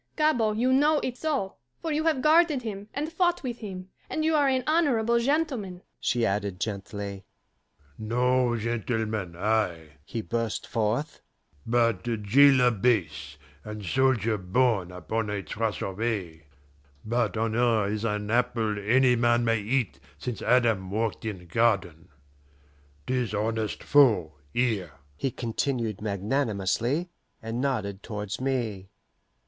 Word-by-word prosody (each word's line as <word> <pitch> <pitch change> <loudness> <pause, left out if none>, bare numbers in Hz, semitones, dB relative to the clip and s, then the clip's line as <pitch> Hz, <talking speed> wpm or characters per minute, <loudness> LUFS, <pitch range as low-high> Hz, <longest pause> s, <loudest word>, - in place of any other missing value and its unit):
Gabord, 240 -9 +2
you 255 +3 +2
know 295 +3 +4
it 250 - -2
so, 275 -9 -2 0.2
for 325 - -3
you 305 +1 0
have 310 -6 +1
guarded 310 -4 +4
him 205 -2 -6
and 305 +3 -4
fought 350 0 +1
with 245 -2 -4
him, 190 -4 -7 0.2
and 315 - -1
you 320 - +2
are 290 -2 +4
an 260 -1 +1
honourable 245 -8 +2
gentleman," 245 - -1 0.2
she 120 -2 +1
added 100 -3 -1
gently. 100 -1 -5 0.8
"No 125 +2 +1
gentleman 110 -4 -2
I," 90 -7 -1
he 115 - -4
burst 115 -1 -2
forth, 115 +8 -1 0.5
"but 115 0 +2 0.2
jailer 130 +3 +6
base, 95 - 0 0.3
and 105 -1 -7
soldier 115 -3 +2
born 95 -1 +1
upon 105 +5 -3
a 100 -1 -3
truss 105 +5 -2
of 95 +1 -5
hay. 90 -9 -3 0.6
But 115 0 0
honour 115 -1 +2
is 105 +1 -2
an 105 -1 -2
apple 115 -3 +1
any 125 +4 +4
man 120 0 +2
may 115 -1 +2
eat 105 - -1 0.2
since 120 - -5
Adam 115 -7 +2
walked 110 +2 -2
in 95 -5 -5
garden.... 90 -4 0 1.0
'Tis 125 -5 -1
honest 110 +1 -2
foe, 110 - +4 0.2
here," 110 - 0 0.2
he 135 - -1
continued 115 -3 -2
magnanimously, 110 - -1 0.3
and 115 +2 -4
nodded 105 -8 -2
towards 105 0 -5
me. 115 -8 -2
115 Hz, 130 wpm, -27 LUFS, 105-145 Hz, 1.0 s, jailer